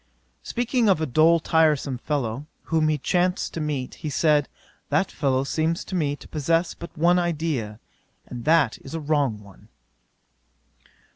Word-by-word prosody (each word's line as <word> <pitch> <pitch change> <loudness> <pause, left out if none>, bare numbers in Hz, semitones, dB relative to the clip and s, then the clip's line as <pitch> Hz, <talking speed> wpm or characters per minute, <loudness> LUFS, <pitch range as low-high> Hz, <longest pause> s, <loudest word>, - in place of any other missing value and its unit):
'Speaking 240 -2 0
of 190 - +3
a 160 - 0
dull 160 +5 +4
tiresome 155 -5 +2
fellow, 135 -1 -3 0.2
whom 160 -1 +1
he 155 -1 +1
chanced 180 +5 0
to 165 - -4
meet, 145 -4 -3
he 155 - -3
said, 150 0 +2 0.4
"That 150 +7 +1
fellow 135 -3 0
seems 160 +4 -1
to - - -9
me 150 -5 0
to - - -14
possess 165 +3 0
but 170 0 -11
one 175 +3 +4
idea, 155 -11 -2 0.5
and 120 -1 -8
that 155 -6 +3
is 135 - -9
a - - -2
wrong 145 -7 0
one." 100 -3 -17
155 Hz, 155 wpm, -24 LUFS, 135-165 Hz, 0.5 s, dull